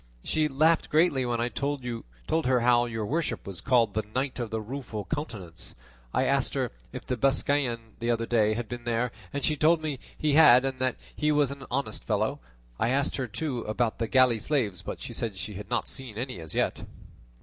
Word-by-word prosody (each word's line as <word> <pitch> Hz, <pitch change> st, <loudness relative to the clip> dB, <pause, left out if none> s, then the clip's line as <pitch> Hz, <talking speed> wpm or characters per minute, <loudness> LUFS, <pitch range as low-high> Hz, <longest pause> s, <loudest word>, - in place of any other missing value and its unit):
She 155 Hz, -1 st, +2 dB
laughed 155 Hz, +4 st, +3 dB
greatly 150 Hz, -5 st, +3 dB
when 120 Hz, -1 st, 0 dB
I 120 Hz, -, +1 dB
told 140 Hz, +3 st, -2 dB
her 125 Hz, -, -1 dB
how 120 Hz, 0 st, +4 dB
your 110 Hz, -2 st, -3 dB
worship 155 Hz, +8 st, -1 dB
was 95 Hz, -3 st, -6 dB
called 115 Hz, -5 st, +3 dB
The 110 Hz, -, +1 dB
Knight 130 Hz, 0 st, -1 dB
of 120 Hz, -2 st, -2 dB
the 110 Hz, 0 st, -2 dB
Rueful 110 Hz, -2 st, -5 dB
Countenance; 110 Hz, -, -6 dB, 0.4 s
I -, -, +1 dB
asked -, -, +1 dB
her -, -, 0 dB, 0.2 s
if -, -, -7 dB
that 125 Hz, -3 st, -3 dB
Biscayan 135 Hz, -4 st, +1 dB
the 115 Hz, -, -2 dB
other 115 Hz, -1 st, +1 dB
day 110 Hz, -2 st, +2 dB
had 120 Hz, 0 st, -3 dB
been 120 Hz, 0 st, -7 dB
there; 120 Hz, +1 st, 0 dB, 0.2 s
and 140 Hz, -1 st, -3 dB
she 155 Hz, -, +2 dB
told 155 Hz, +3 st, +4 dB
me 145 Hz, -4 st, -2 dB, 0.2 s
he 150 Hz, -2 st, +1 dB
had, 135 Hz, -4 st, +8 dB
and 135 Hz, -1 st, -2 dB
that 130 Hz, -1 st, +1 dB, 0.2 s
he 150 Hz, 0 st, +1 dB
was 145 Hz, -2 st, +3 dB
an 140 Hz, -2 st, -8 dB
honest 125 Hz, -5 st, -2 dB
fellow; -, -, 0 dB, 0.4 s
I 115 Hz, -, +2 dB
asked 140 Hz, +2 st, +1 dB
her 130 Hz, -2 st, -2 dB
too 125 Hz, +4 st, -3 dB
about 110 Hz, +1 st, -1 dB
the 115 Hz, -, 0 dB
galley 130 Hz, -2 st, +4 dB
slaves, 110 Hz, -, 0 dB
but -, -, -6 dB
she -, -, -6 dB
said 110 Hz, -5 st, -3 dB
she 95 Hz, +3 st, -5 dB
had 105 Hz, +2 st, -8 dB
not 120 Hz, -1 st, 0 dB
seen 125 Hz, -6 st, -5 dB
any 125 Hz, -5 st, -4 dB
as 80 Hz, -2 st, -8 dB
yet." -, -, 0 dB
125 Hz, 210 wpm, -28 LUFS, 115-140 Hz, 0.4 s, had